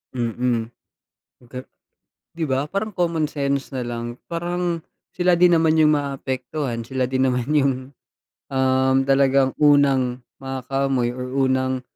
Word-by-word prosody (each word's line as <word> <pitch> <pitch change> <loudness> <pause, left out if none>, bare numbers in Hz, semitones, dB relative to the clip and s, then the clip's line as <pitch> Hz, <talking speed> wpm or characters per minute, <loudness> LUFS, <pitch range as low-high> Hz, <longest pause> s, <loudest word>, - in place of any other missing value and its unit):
Mm. 120 -1 -1 0.7
Baga 125 +1 -9 0.7
‘di 165 -3 -3
ba, 130 +2 0
parang 200 +7 -3
common 165 -4 0
sense 140 -1 -2
na 130 -3 -4
lang, 120 0 -5
parang 175 0 -2 0.3
sila 180 -1 +2
din 175 0 +5
naman 160 -1 +3
yung 155 -1 +5
maapektuhan, 135 -2 -3
sila 130 +2 -2
din 130 +1 +1
naman 125 -1 -1
yung, 140 -2 +3 0.8
um, 130 0 +2
talagang 135 0 +3
unang 135 -4 +3 0.2
makakaamoy 135 -1 -1
or 125 +1 -5
unang, 130 -1 +1
135 Hz, 125 wpm, -22 LUFS, 130-150 Hz, 0.8 s, din